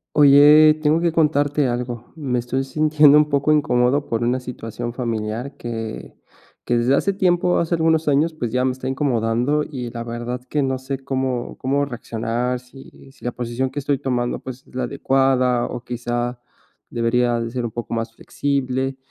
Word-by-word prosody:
Oye, 150 Hz, +2 st, +7 dB
tengo 155 Hz, +2 st, +3 dB
que 170 Hz, -1 st, +1 dB
contarte 145 Hz, -3 st, +2 dB
algo. 120 Hz, -1 st, -4 dB
Me 130 Hz, -6 st, -2 dB
estoy 130 Hz, +3 st, -2 dB
sintiendo 150 Hz, +1 st, +4 dB
un 150 Hz, -, +2 dB
poco 145 Hz, +1 st, +2 dB
incómodo 140 Hz, -1 st, +2 dB
por 115 Hz, 0 st, -1 dB
una 125 Hz, +2 st, +1 dB
situación 120 Hz, -1 st, -6 dB
familiar 115 Hz, +1 st, -3 dB
que 115 Hz, -, -6 dB, 0.5 s
que 120 Hz, -, +1 dB
desde 120 Hz, +3 st, +3 dB
hace 200 Hz, +7 st, +1 dB
tiempo, 180 Hz, -2 st, +2 dB
hace 170 Hz, +1 st, 0 dB
algunos 160 Hz, -1 st, +2 dB
años, 150 Hz, +4 st, +2 dB
pues, 120 Hz, -7 st, -4 dB
ya 125 Hz, +1 st, +1 dB
me 130 Hz, -, +1 dB
está 130 Hz, 0 st, -5 dB
incomodando 130 Hz, +1 st, 0 dB
y 130 Hz, -6 st, -6 dB
la 115 Hz, 0 st, -6 dB
verdad 120 Hz, +1 st, -5 dB
que 150 Hz, -, 0 dB
no 130 Hz, -1 st, -1 dB
sé 135 Hz, +1 st, -4 dB
cómo 130 Hz, -2 st, -3 dB
cómo 140 Hz, +2 st, 0 dB
reaccionar, 120 Hz, 0 st, -3 dB
si 135 Hz, +2 st, -16 dB
si -, -, -22 dB
la 120 Hz, -, -2 dB
posición 120 Hz, +2 st, -3 dB
que 145 Hz, -, -5 dB
estoy 140 Hz, -1 st, -1 dB
tomando, 125 Hz, -3 st, -1 dB
pues, 130 Hz, 0 st, -9 dB
es -, -, -19 dB
la 130 Hz, -, -1 dB
adecuada 130 Hz, -1 st, +1 dB
o, 125 Hz, -, -5 dB
quizá, 120 Hz, 0 st, -3 dB, 0.5 s
debería 120 Hz, 0 st, +1 dB
de 115 Hz, 0 st, -4 dB
ser 125 Hz, 0 st, -3 dB
un 115 Hz, -, -3 dB
poco 120 Hz, -1 st, -6 dB
más 115 Hz, -1 st, -2 dB
flexible. 135 Hz, 0 st, -2 dB
130 Hz, 180 wpm, -21 LUFS, 120-145 Hz, 0.5 s, Oye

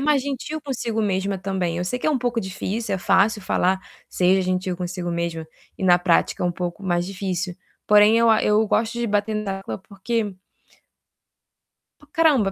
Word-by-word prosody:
mais 285 Hz, -1 st, +2 dB
gentil 285 Hz, +3 st, -4 dB
consigo 230 Hz, -5 st, -2 dB
mesma 195 Hz, 0 st, 0 dB
também. 185 Hz, -3 st, -2 dB
Eu 180 Hz, -, -1 dB
sei 250 Hz, +7 st, -2 dB
que -, -, -3 dB
é -, -, +4 dB
um 280 Hz, -, +1 dB
pouco 240 Hz, -1 st, -1 dB
difícil, 200 Hz, +2 st, -3 dB
é -, -, -2 dB
fácil 200 Hz, +2 st, +2 dB
falar: 190 Hz, 0 st, +1 dB, 0.3 s
"Seja 185 Hz, +1 st, +3 dB
gentil 185 Hz, 0 st, -1 dB
consigo 175 Hz, -1 st, -4 dB
mesma", 170 Hz, -1 st, -3 dB, 0.3 s
e -, -, -6 dB
na 175 Hz, -1 st, +6 dB
prática 175 Hz, 0 st, +1 dB
é -, -, +3 dB
um 175 Hz, -, 0 dB
pouco 175 Hz, +2 st, -5 dB
mais 175 Hz, -1 st, +1 dB
difícil. 185 Hz, -2 st, -3 dB, 0.3 s
Porém 210 Hz, +2 st, +6 dB
eu 230 Hz, -1 st, +5 dB
a 220 Hz, -, +4 dB
eu 210 Hz, +1 st, +3 dB
gosto 225 Hz, +2 st, +1 dB
de 235 Hz, -, 0 dB
bater 205 Hz, +1 st, 0 dB
na 200 Hz, -2 st, -2 dB
tecla 195 Hz, -, -6 dB
porque 205 Hz, +1 st, -3 dB, 1.6 s
P 295 Hz, -, -19 dB
caramba, 295 Hz, -, +3 dB
195 Hz, 185 wpm, -23 LUFS, 185-225 Hz, 1.6 s, na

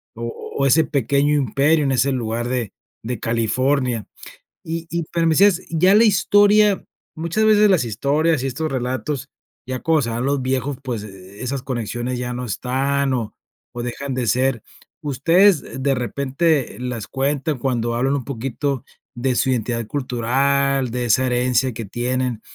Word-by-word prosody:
O 115 Hz, +1 st, -6 dB, 0.2 s
o 140 Hz, -, +1 dB
ese 150 Hz, +4 st, +4 dB
pequeño 140 Hz, +1 st, +1 dB
imperio 145 Hz, +4 st, +2 dB
en 135 Hz, -, +1 dB
ese 135 Hz, +1 st, +2 dB
lugar 120 Hz, -1 st, -2 dB
de 120 Hz, -5 st, -2 dB, 0.3 s
de 115 Hz, -1 st, -4 dB
California. 120 Hz, +1 st, 0 dB, 0.6 s
Y 165 Hz, 0 st, -5 dB
y 170 Hz, 0 st, -2 dB
pero 170 Hz, -1 st, +1 dB
me 160 Hz, -, +3 dB
decías, 195 Hz, -2 st, +5 dB
ya 180 Hz, +5 st, +4 dB
la 225 Hz, +2 st, +6 dB
historia 205 Hz, 0 st, +4 dB, 0.3 s
muchas 170 Hz, +7 st, -1 dB
veces 210 Hz, -1 st, +5 dB
las 180 Hz, -8 st, +3 dB
historias 140 Hz, +7 st, +1 dB
y -, -, 0 dB
estos 155 Hz, +4 st, -3 dB
relatos, 130 Hz, +2 st, -3 dB, 0.4 s
ya 130 Hz, -1 st, -4 dB
conocerán 125 Hz, -7 st, 0 dB
los 140 Hz, 0 st, 0 dB
viejos, 130 Hz, +1 st, -1 dB
pues, 120 Hz, -6 st, -4 dB
e 95 Hz, +2 st, -11 dB
esas 135 Hz, +1 st, -3 dB
conexiones 120 Hz, -1 st, -3 dB
ya 125 Hz, 0 st, -3 dB
no 125 Hz, 0 st, -4 dB
están 135 Hz, +5 st, -1 dB
o 115 Hz, -4 st, -3 dB, 0.4 s
o 120 Hz, 0 st, -5 dB
dejan 135 Hz, +3 st, -4 dB
de 125 Hz, -2 st, -2 dB
ser. 130 Hz, -1 st, +1 dB, 0.4 s
Ustedes, 165 Hz, +1 st, +2 dB
de 135 Hz, 0 st, +2 dB
repente, 140 Hz, +4 st, 0 dB
las 125 Hz, -4 st, -4 dB
cuentan 140 Hz, +1 st, -1 dB
cuando 120 Hz, -2 st, -1 dB
hablan 135 Hz, +3 st, +1 dB
un 135 Hz, -4 st, -3 dB
poquito 135 Hz, +1 st, -3 dB, 0.3 s
de 125 Hz, +1 st, 0 dB
su 130 Hz, -, +1 dB
identidad 115 Hz, -2 st, -1 dB
cultural, 135 Hz, 0 st, 0 dB
de 125 Hz, 0 st, -2 dB
esa 130 Hz, +3 st, +3 dB
herencia 125 Hz, 0 st, +1 dB
que 115 Hz, -1 st, -6 dB
tienen, 125 Hz, +1 st, -2 dB
130 Hz, 160 wpm, -21 LUFS, 120-145 Hz, 0.6 s, la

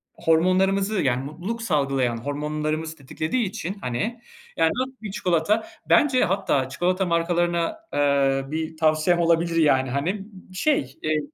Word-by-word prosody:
hormonlarımızı, 190 Hz, +5 st, +2 dB
yani, 130 Hz, -1 st, +1 dB
mutluluk 185 Hz, +11 st, -5 dB
salgılayan 135 Hz, -, 0 dB
hormonlarımızı 150 Hz, +4 st, -3 dB
tetiklediği 155 Hz, -, -2 dB
için, 190 Hz, 0 st, -5 dB
hani, 210 Hz, -, -3 dB, 0.4 s
yani, 160 Hz, 0 st, +3 dB
nasıl 260 Hz, +1 st, -2 dB
bir 215 Hz, -3 st, -6 dB
çikolata, 185 Hz, +3 st, +1 dB, 0.2 s
bence 265 Hz, -4 st, +4 dB
hatta 175 Hz, -8 st, 0 dB
çikolata 180 Hz, +7 st, 0 dB
markalarına, 170 Hz, -, 0 dB, 0.2 s
eee, 140 Hz, -1 st, +2 dB
bir 160 Hz, 0 st, -3 dB
tavsiyem 155 Hz, +2 st, +2 dB
olabilir, 170 Hz, 0 st, +2 dB
yani, 135 Hz, -5 st, +3 dB
hani, 175 Hz, +10 st, -2 dB, 0.3 s
şey, 185 Hz, -, 0 dB
eee, 155 Hz, 0 st, +1 dB
165 Hz, 125 wpm, -24 LUFS, 145-190 Hz, 0.4 s, bence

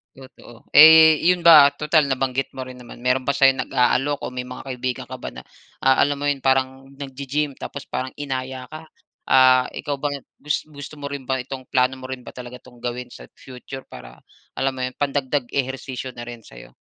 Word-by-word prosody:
Totoo. 130 Hz, -3 st, -16 dB
Eh, 160 Hz, 0 st, +8 dB
'yon 180 Hz, +1 st, +3 dB
ba, 155 Hz, -4 st, +8 dB
total 150 Hz, +2 st, +2 dB
nabanggit 135 Hz, 0 st, -1 dB
mo 130 Hz, -1 st, -7 dB
rin 130 Hz, -, -10 dB
naman, 125 Hz, -1 st, -13 dB
meron 125 Hz, +1 st, 0 dB
ba 140 Hz, -, +1 dB
sa'yong 135 Hz, -1 st, +3 dB
nag-aalok 135 Hz, +3 st, +1 dB
o -, -, -5 dB
may 125 Hz, 0 st, -5 dB
mga 125 Hz, +2 st, -10 dB
kaibigan 125 Hz, -1 st, -4 dB
ka -, -, -7 dB
ba -, -, -7 dB
na -, -, -10 dB, 0.4 s
a 135 Hz, 0 st, +4 dB
alam 145 Hz, 0 st, -1 dB
mo 145 Hz, -, -2 dB
'yon 140 Hz, -2 st, -1 dB
parang 135 Hz, 0 st, 0 dB
naggi-gym 140 Hz, +1 st, -3 dB
tapos 140 Hz, -1 st, -8 dB
parang 130 Hz, +1 st, -4 dB
inaya 130 Hz, -2 st, -5 dB
ka? 155 Hz, +1 st, -10 dB, 0.4 s
Ah, 130 Hz, -1 st, +4 dB
ikaw 145 Hz, -1 st, -4 dB
ba 145 Hz, +1 st, -3 dB, 0.3 s
gus 150 Hz, +1 st, -2 dB
gusto 145 Hz, 0 st, -11 dB
mo 140 Hz, -, -5 dB
rin 140 Hz, -1 st, -6 dB
ba 130 Hz, +1 st, -2 dB
itong 130 Hz, +1 st, -7 dB
plano 130 Hz, 0 st, +2 dB
mo 130 Hz, 0 st, -9 dB
rin 125 Hz, -1 st, -8 dB
ba -, -, -10 dB
talaga 125 Hz, 0 st, -9 dB
itong 125 Hz, -2 st, -19 dB
gawin 125 Hz, 0 st, -4 dB
sa 120 Hz, -, -13 dB, 0.2 s
future 130 Hz, +1 st, -10 dB
para -, -, -12 dB, 0.4 s
alam 135 Hz, 0 st, 0 dB
mo 130 Hz, -, -4 dB
'yon, 125 Hz, 0 st, -4 dB
pandagdag 140 Hz, -2 st, -1 dB
ehersisyo 130 Hz, -1 st, -4 dB
na 120 Hz, -1 st, -10 dB
rin 120 Hz, -2 st, -9 dB
sa -, -, -14 dB
'yo? -, -, -15 dB
130 Hz, 205 wpm, -22 LUFS, 125-140 Hz, 0.4 s, Eh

